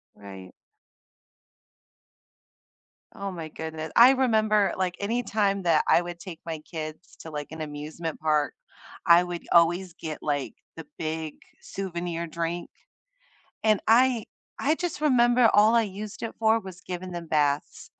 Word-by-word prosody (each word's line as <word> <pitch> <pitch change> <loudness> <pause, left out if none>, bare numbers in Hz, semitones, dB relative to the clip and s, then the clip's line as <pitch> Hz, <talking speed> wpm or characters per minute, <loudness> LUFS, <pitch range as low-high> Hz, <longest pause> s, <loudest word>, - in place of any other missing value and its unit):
Right. 95 -2 -11 2.6
Oh 200 0 -4
my 165 -3 -7
goodne 160 0 -6
I 245 +3 +9
remember, 215 -6 +2
like, 185 -2 -1
anytime 200 -2 0
that 165 -3 +3
I - - +5
would 175 -1 -7
take 175 -2 -9
my 165 -2 -4
kids 155 +1 -8
to, 160 - -9
like, 150 -1 -6
an 160 0 -7
amusement 155 +2 -6
park, 150 -1 +1 0.5
I 170 +1 +7
would 175 -1 -6
always 175 +2 +3
get, 155 -1 -6
like, 145 -2 -2 0.2
the 165 - -8
big 160 -1 -3 0.3
souvenir 175 -3 -4
drink, 170 +1 -4 0.9
and 215 -2 +3
I 240 0 +4 0.3
I 300 +3 +2
just 345 -2 -4
remember 240 -4 +4
all 215 +2 +5
I 230 - +5
used 210 0 -7
it 230 - -4
for 220 0 +3
was 185 -3 -10
giving 180 0 -6
them 170 -1 -6
baths. 145 -2 -1
175 Hz, 140 wpm, -26 LUFS, 160-215 Hz, 2.6 s, I